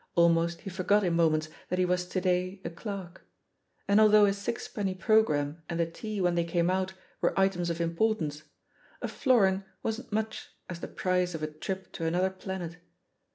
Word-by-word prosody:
Almost 170 Hz, 0 st, +3 dB
he 195 Hz, -, -6 dB
forgot 200 Hz, +3 st, +2 dB
in 175 Hz, -2 st, +1 dB
moments 155 Hz, -2 st, +2 dB, 0.2 s
that 180 Hz, -, 0 dB
he 185 Hz, -, +3 dB
was 180 Hz, 0 st, 0 dB
to 185 Hz, -, -1 dB
day 185 Hz, +1 st, 0 dB
a -, -, -3 dB
clerk. 190 Hz, 0 st, -7 dB, 0.6 s
And 200 Hz, +2 st, +5 dB
although 215 Hz, -1 st, +7 dB
a 200 Hz, -, +3 dB
sixpenny 200 Hz, -1 st, -3 dB
programme 165 Hz, -6 st, +2 dB
and 170 Hz, -1 st, -2 dB
the 170 Hz, -, +3 dB
tea 210 Hz, +5 st, -5 dB
when 180 Hz, -2 st, +2 dB
they 170 Hz, 0 st, +2 dB
came 170 Hz, +1 st, +1 dB
out 190 Hz, 0 st, -1 dB, 0.3 s
were -, -, +1 dB
items 185 Hz, -3 st, +2 dB
of 170 Hz, 0 st, -2 dB
importance, 165 Hz, -3 st, 0 dB, 0.6 s
a -, -, 0 dB
florin 200 Hz, -7 st, +3 dB, 0.2 s
wasn't 225 Hz, +2 st, -3 dB
much 220 Hz, +1 st, -2 dB, 0.2 s
as 175 Hz, -2 st, -6 dB
the -, -, -5 dB
price 180 Hz, -2 st, 0 dB
of 155 Hz, -, -5 dB
a -, -, 0 dB
trip 185 Hz, +5 st, -6 dB
to 165 Hz, -3 st, -3 dB
an 165 Hz, -, 0 dB
other 185 Hz, +1 st, +2 dB
planet. 190 Hz, -3 st, -6 dB
180 Hz, 190 wpm, -29 LUFS, 170-200 Hz, 0.6 s, although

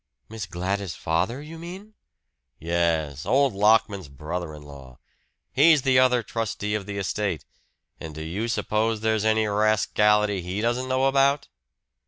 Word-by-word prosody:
"Miss 110 Hz, -2 st, -6 dB
Gladys' 95 Hz, 0 st, -3 dB
father, 95 Hz, -, -1 dB
you 160 Hz, +2 st, -10 dB
mean?" 190 Hz, +6 st, -9 dB, 0.6 s
"Yes; 80 Hz, -3 st, -1 dB
old 135 Hz, 0 st, +2 dB
Lockman's 105 Hz, -3 st, +2 dB
brother 75 Hz, +4 st, -6 dB
in 75 Hz, -, -12 dB
law. 70 Hz, -4 st, -13 dB, 0.6 s
He's 150 Hz, +1 st, +5 dB
the 130 Hz, -1 st, +4 dB
other 125 Hz, -2 st, +3 dB
trustee 110 Hz, -2 st, -3 dB
of 105 Hz, -2 st, -3 dB
the 100 Hz, -1 st, -5 dB
estate. 100 Hz, -3 st, -2 dB, 0.5 s
And 80 Hz, -2 st, -8 dB
do 80 Hz, -, -6 dB
you 95 Hz, +9 st, -3 dB
suppose 110 Hz, -1 st, -1 dB
there's 110 Hz, -1 st, +1 dB
any 110 Hz, 0 st, +3 dB
rascality 105 Hz, -1 st, +2 dB
he 90 Hz, +3 st, -4 dB
doesn't 120 Hz, +3 st, -1 dB
know 130 Hz, +1 st, +2 dB
about?" 140 Hz, +1 st, +2 dB
105 Hz, 145 wpm, -25 LUFS, 85-120 Hz, 0.6 s, He's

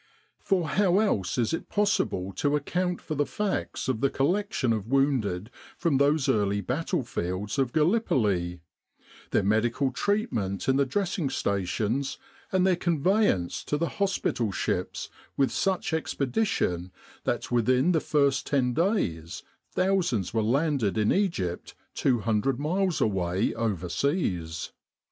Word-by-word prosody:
For 180 Hz, -5 st, 0 dB
how 190 Hz, 0 st, +3 dB
else 190 Hz, -, +1 dB
is 120 Hz, +1 st, +1 dB
it 165 Hz, -, -4 dB
possible 195 Hz, -, 0 dB
to 145 Hz, 0 st, +2 dB
account 180 Hz, +5 st, -1 dB
for 155 Hz, -, -5 dB
the 145 Hz, -1 st, 0 dB
facts 210 Hz, -2 st, -2 dB
of 125 Hz, -4 st, -1 dB
the 140 Hz, -, +3 dB
collection 165 Hz, -, 0 dB
of 110 Hz, -2 st, -3 dB
wounded 120 Hz, -7 st, +1 dB, 0.3 s
from 165 Hz, -5 st, +1 dB
those 140 Hz, +1 st, +3 dB
early 100 Hz, -1 st, +2 dB
battle 130 Hz, -, -1 dB
fields 100 Hz, +1 st, -3 dB
of 130 Hz, -3 st, +1 dB
Gallipoli; 110 Hz, -, +1 dB, 0.7 s
their -, -, +2 dB
medical 115 Hz, +6 st, +1 dB
treatment 125 Hz, -, -1 dB
in 135 Hz, 0 st, +3 dB
the 140 Hz, -1 st, +2 dB
dressing 180 Hz, -2 st, -1 dB
stations 110 Hz, +6 st, -1 dB, 0.3 s
and 185 Hz, -1 st, +3 dB
their 190 Hz, -1 st, +4 dB
conveyance 170 Hz, -, +1 dB
to 150 Hz, -, 0 dB
the 170 Hz, +2 st, -1 dB
hospital 185 Hz, -, 0 dB
ships -, -, -2 dB, 0.3 s
with 135 Hz, -1 st, +2 dB
such 190 Hz, -3 st, 0 dB
expedition 140 Hz, -, -1 dB, 0.3 s
that -, -, -2 dB
within 125 Hz, +7 st, +3 dB
the 165 Hz, -, +3 dB
first 140 Hz, -4 st, +1 dB
ten 130 Hz, -3 st, +1 dB
days 95 Hz, -, -1 dB, 0.3 s
thousands 175 Hz, -, +1 dB
were 115 Hz, -, +2 dB
landed 130 Hz, -2 st, +1 dB
in 105 Hz, -1 st, +3 dB
Egypt 100 Hz, -, -1 dB, 0.2 s
200 120 Hz, 0 st, +1 dB
miles 180 Hz, +4 st, 0 dB
away 95 Hz, -1 st, +1 dB
overseas 90 Hz, -, -1 dB
135 Hz, 130 wpm, -27 LUFS, 105-175 Hz, 0.7 s, their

